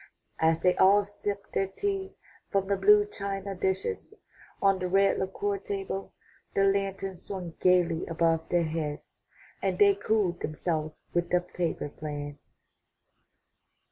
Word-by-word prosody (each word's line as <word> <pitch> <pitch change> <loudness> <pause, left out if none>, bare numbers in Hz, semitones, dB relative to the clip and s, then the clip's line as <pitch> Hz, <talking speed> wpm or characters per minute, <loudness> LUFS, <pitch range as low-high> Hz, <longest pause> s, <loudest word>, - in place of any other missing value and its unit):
As 160 0 +3
they 180 0 +4
all 200 +2 +6
sipped 200 0 -5
their 195 - +1
tea 390 - -3 0.3
from 195 -1 +1
the 200 +1 +1
blue 205 +2 +6
china 200 -1 -4
dishes 190 - -2 0.4
on 195 -1 +3
the 180 - -1
red 195 +2 +3
lacquer 200 +1 -2
table, 195 0 -4 0.4
the 195 - +4
lantern 195 -1 0
swung 180 -4 -6
gaily 180 -2 +3
above 165 -1 +1
their 175 -1 +3
heads 155 -2 -4 0.4
and - - 0
they 405 -1 +6
cooled 215 - 0
themselves 155 0 -3
with 175 0 0
the 180 - +4
paper 175 -4 -3
fan. 145 -1 -5
190 Hz, 135 wpm, -28 LUFS, 170-200 Hz, 0.4 s, all